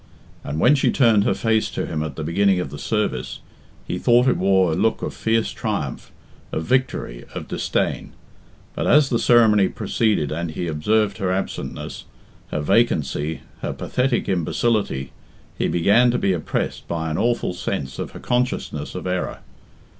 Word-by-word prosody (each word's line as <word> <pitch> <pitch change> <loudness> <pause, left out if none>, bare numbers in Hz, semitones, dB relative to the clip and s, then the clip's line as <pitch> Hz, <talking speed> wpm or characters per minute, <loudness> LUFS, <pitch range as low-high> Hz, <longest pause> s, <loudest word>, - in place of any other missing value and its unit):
And 75 +3 -4
when 125 - +5
she 140 - +2
turned 115 -6 +4
her - - +2
face 110 -1 +1
to - - -3
him 75 - -3
at 75 -3 -4
the 80 - -4
beginning 95 +4 +2
of 90 - -4
the 75 - -7
service, 70 - -2 0.5
he - - -3
thought 120 +2 +4
it 125 - +4
wore 95 -2 +3
a - - 0
look 115 - +1
of - - -3
fierce 115 0 0
triumph, - - -4 0.4
of 80 - -2
victory, 125 - -1
of - - -5
disdain. - - -2 0.6
But - - -2
as 150 -2 +5
the 120 - +2
ceremony 110 -5 +5
proceeded 105 - 0
and 85 +2 -2
he 80 +3 -4
observed 100 +7 +1
her 95 -3 0
absent 95 +1 -3
ness, - - -7 0.4
her 75 - -3
vacancy, 75 - +1 0.2
her - - -2
pathetic 125 -1 -1
imbecility, 90 - 0 0.4
he - - 0
began 105 +8 +4
to 120 - +1
be 95 - +1
oppressed 85 - -3
by 80 -1 -2
an 75 - -1
awful 120 -5 0
sense 90 -8 -4
of - - -3
her - - -10
consciousness 125 - -2
of 90 - -5
error. 90 0 -2
95 Hz, 170 wpm, -22 LUFS, 80-115 Hz, 0.6 s, when